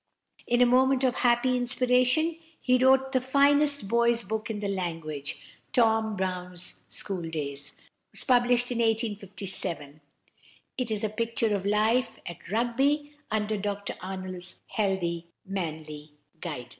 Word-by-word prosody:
In 240 +1 +3
a - - +8
moment 260 +2 +4
of 255 -2 +3
happy 250 +1 +3
inspiration, 250 +6 +2 0.2
he 255 0 +3
wrote 265 0 +5
the 260 -2 +2
finest 285 -1 +3
boy's 235 +1 +3
book 215 +3 -3
in 215 -2 -3
the 205 - -2
language. 165 -7 -4 0.3
"Tom 220 -2 +3
Brown's 180 -1 -4
School 180 -5 -4
Days" 145 -3 -5 0.4
was - - -1
published 245 -1 +3
in 240 - -1
1857. 200 - -1 0.7
It 250 -3 -2
is 215 -1 -2
a 215 - +1
picture 230 0 0
of 200 0 -2
life 220 +4 +2
at 170 - -9
Rugby, 270 +6 +1 0.2
under 215 0 0
Dr 200 0 -3
Arnold's 185 -1 -5
healthy, 175 -5 -1 0.2
manly 155 -5 -5 0.3
guidance. 145 -9 -6
220 Hz, 130 wpm, -28 LUFS, 185-250 Hz, 0.7 s, a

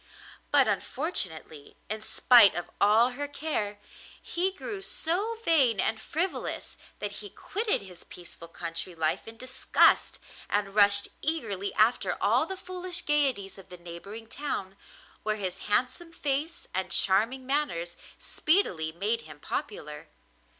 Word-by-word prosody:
But - - +5
unfortunately, 160 - -3
in 215 +1 -4
spite 230 -1 +6
of 175 0 -4
all 220 +5 +5
her 285 +3 -4
care, 280 -8 -2 0.4
he 365 +3 -1
grew 395 +1 -6
so 390 +5 -1
vain 265 -11 +4
and 220 0 0
frivolous 345 +9 -3 0.2
that 205 -1 -4
he 205 - -8
quitted 420 - -2
his 180 -3 -13
peaceful 170 -1 -11
country 170 +1 -6
life 160 +4 0
in 225 0 -10
disgust, 255 +2 +3 0.3
and 200 -1 0
rushed 200 -1 +4
eagerly 220 - -2
after 225 +3 +3
all - - +3
the 380 - -5
foolish 365 -1 -6
gaieties 265 -11 +1
of 190 - -15
the 180 - -10
neighbouring 175 +6 -9
town, 220 -7 -4 0.5
where 215 0 0
his 190 -3 -5
handsome 255 +10 0
face 305 +3 -2
and 185 0 -2
charming 220 +9 +2
manners 255 - 0 0.2
speedily 185 - +1
made 205 +8 0
him 150 -1 -13
popular. 150 +1 -5
220 Hz, 135 wpm, -28 LUFS, 190-295 Hz, 0.5 s, spite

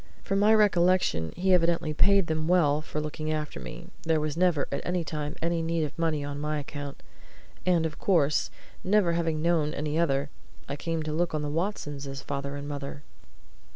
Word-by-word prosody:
From 195 0 0
my 210 +2 +5
recollection 180 - +3
he 185 +2 +2
evidently 170 -3 +2
paid 200 +4 +4
them 160 -1 -1
well 155 -5 +3
for 155 - -4
looking 155 +1 -3
after 150 -1 -3
me 175 - -8
there 160 -1 +1
was 150 -1 -2
never, 175 -4 +2
at 140 - -2
any 180 -1 -1
time, 150 -1 -4
any 170 0 +1
need 165 0 0
of 150 -1 -4
money 160 -3 +1
on 145 0 -5
my 150 0 -1
account. 145 -1 -6 0.6
And 170 -3 +3
of 155 -2 -4
course, 155 -6 +2 0.3
never 195 -2 +3
having 165 -2 0
known 165 -3 +2
any 150 +2 -1
other, 140 -3 +1 0.4
I 140 - -3
came 165 +2 -2
to 155 0 -3
look 170 0 0
on 150 - -1
the 145 - -2
Watsons 150 -5 -3
as 135 0 -6
father 140 0 -4
and 145 0 -6
mother. 145 0 -6
155 Hz, 190 wpm, -28 LUFS, 145-170 Hz, 0.6 s, my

